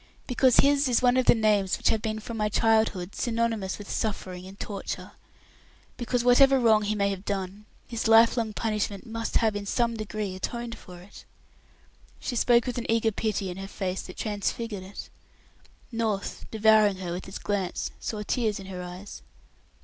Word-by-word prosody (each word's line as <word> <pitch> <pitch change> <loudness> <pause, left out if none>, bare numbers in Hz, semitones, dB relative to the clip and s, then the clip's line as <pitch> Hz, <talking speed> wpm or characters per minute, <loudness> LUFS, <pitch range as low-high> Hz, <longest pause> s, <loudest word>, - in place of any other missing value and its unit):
"Because 250 -1 +4
his 280 0 +3
is 245 +1 +2
one 245 0 +5
of 255 -1 +2
the - - +7
names 210 -4 +2
which - - +1
have 220 - +1
been 220 -1 -2
from 230 +2 -7
my 210 -1 0
childhood 220 -4 +2
synonymous 230 -5 -1
with 205 - -10
suffering 185 -4 -3
and 195 +1 -12
torture, 200 -2 -5 0.8
because 240 0 -1
whatever 270 +2 +6
wrong 220 -3 +5
he 210 0 -1
may 200 -1 +1
have 195 -1 -5
done, 200 0 -4 0.2
his 230 -2 -2
life 225 +1 +6
long 225 -3 -1
punishment 210 -2 -2
must 230 0 -4
have 220 -2 +1
in 205 0 -4
some 235 +1 +1
degree 215 -2 -4
atoned 235 +4 -4
for 180 -2 -12
it." 185 - -14 1.0
She 250 - -4
spoke 235 0 +4
with 250 -1 -2
an 235 - -6
eager 225 0 +2
pity 205 -3 -2
in 180 - -8
her 195 0 -6
face 190 -1 -3
that - - -10
transfigured 210 0 -3
it. 190 +2 -9 0.8
North, 220 -4 -2
devouring 215 -2 +4
her 180 -2 -5
with 175 +2 -5
his 190 - -7
glance, 195 -3 -2
saw 210 -2 -4
tears 215 -2 -1
in 195 - -9
her 185 -1 -6
eyes. 180 +3 -9
215 Hz, 180 wpm, -27 LUFS, 195-230 Hz, 1.0 s, the